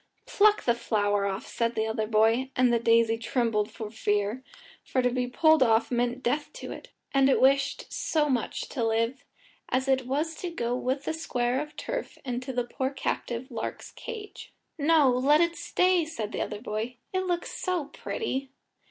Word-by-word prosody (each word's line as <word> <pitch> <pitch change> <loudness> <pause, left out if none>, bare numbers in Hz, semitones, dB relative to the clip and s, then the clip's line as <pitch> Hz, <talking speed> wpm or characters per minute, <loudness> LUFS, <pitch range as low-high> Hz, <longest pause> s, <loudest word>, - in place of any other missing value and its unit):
"Pluck 425 -4 +4
the 235 - +3
flower 205 -3 0
off," 195 -1 -3
said 230 0 -1
the 220 - +1
other 220 -1 -1
boy, 225 +4 +3
and 250 -1 +4
the 235 - +3
daisy 230 0 +3
trembled 230 -3 0
for 215 -2 -7
fear, 210 +3 -1 0.4
for 260 - -1
to 250 - +2
be 250 0 -1
pulled 315 +5 +4
off 225 -1 +3
meant 245 +1 0
death 290 +5 0
to - - -7
it; - - -9 0.2
and 275 0 +5
it - - +4
wished 275 +1 +3
so 305 -2 +1
much 255 -5 -1
to 245 - -2
live, 230 +4 0 0.5
as 260 +1 0
it 265 -2 +2
was 300 +5 -1
to 360 - -4
go 245 -7 -2
with 260 +2 -1
the - - -1
square 255 -5 -1
of 300 0 -8
turf - - -4
into 255 +1 -3
the 250 -1 0
poor 260 +2 -2
captive 255 -2 -3
lark's 230 - -5
cage. 440 -4 -8 0.2
"No 310 -1 +4
let 260 +4 +4
it 340 0 +2
stay," 355 +1 +2
said 230 -10 -5
the - - -3
other 210 - -3
boy, 225 +2 -3 0.2
"it 375 0 0
looks 350 -1 -1
so 360 -5 -2
pretty." 275 - -4
255 Hz, 185 wpm, -28 LUFS, 230-300 Hz, 0.5 s, and